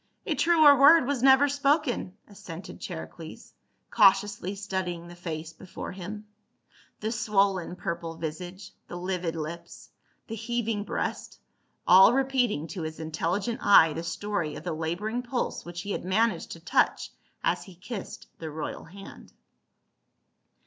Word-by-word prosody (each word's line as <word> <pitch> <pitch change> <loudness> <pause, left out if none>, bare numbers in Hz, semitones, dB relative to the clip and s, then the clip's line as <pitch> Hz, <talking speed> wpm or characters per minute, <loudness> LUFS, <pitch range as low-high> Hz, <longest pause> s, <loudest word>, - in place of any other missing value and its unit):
"A - - 0
truer 315 -4 +6
word 290 +1 +8
was 275 -2 -1
never 265 +2 +6
spoken," 280 - 0
assented 185 -3 -10
Chari - - -6
cles, - - -12 0.4
cautiously 200 -2 +3
studying 190 -4 -4
the 175 - -11
face 165 -2 -6
before 180 +2 -8
him. 200 +3 -7 0.8
The 215 +1 -2
swollen 195 -6 +1
purple 170 -2 -5
visage, 175 +4 -6 0.2
the - - -8
livid 180 -2 -3
lips, 160 +2 -7 0.3
the 225 - -7
heaving 225 -2 -2
breast, - - -4 0.5
all 190 +5 +8
repeating 255 - +1
to 185 - -5
his 160 0 -5
intelligent 170 +8 -2
eye 165 -6 +6
the 165 - -4
story 175 -2 -3
of - - -8
the 175 -1 -3
laboring 175 +9 -2
pulse 250 0 -3
which 175 0 -6
he 200 - -5
had - - -3
managed 220 +6 +1
to - - -11
touch - - +1 0.3
as - - 0
he 190 - -13
kissed 200 +3 -7
the 160 - -5
royal 155 0 -6
hand. 195 +4 -13
190 Hz, 140 wpm, -27 LUFS, 170-230 Hz, 0.8 s, word